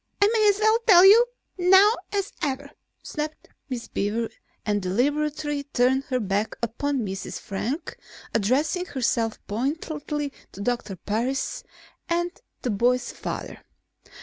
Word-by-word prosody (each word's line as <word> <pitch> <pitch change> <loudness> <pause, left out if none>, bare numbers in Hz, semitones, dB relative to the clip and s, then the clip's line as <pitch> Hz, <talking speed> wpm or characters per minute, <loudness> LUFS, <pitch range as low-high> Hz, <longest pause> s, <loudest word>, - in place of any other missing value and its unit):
"I 405 - +6
may 430 -2 +5
as 400 - +3
well 435 +1 +4
tell 365 -3 +9
you 430 +5 +9 0.4
now 380 +4 +7 0.2
as 400 -1 -2
ever," 280 0 -2 0.3
snapped 305 0 -5 0.2
Miss 245 -3 -4
Beaver 220 +3 -1 0.4
and 205 -1 +1
deliberately 290 +8 0
turned 265 -1 +1
her 255 -2 -1
back 205 0 -1
upon 250 +2 -1
Mrs. 190 -2 -5
Frank, 240 - -4 0.4
addressing 280 - +1
herself 235 -6 0
pointedly 290 +4 -3 0.2
to 200 - -8
Doctor 220 -3 -2
Parris 235 +9 -2 0.5
and 345 +1 +1 0.3
the 245 - 0
boy's 245 +5 +1
father. - - -6
270 Hz, 125 wpm, -25 LUFS, 225-315 Hz, 0.5 s, tell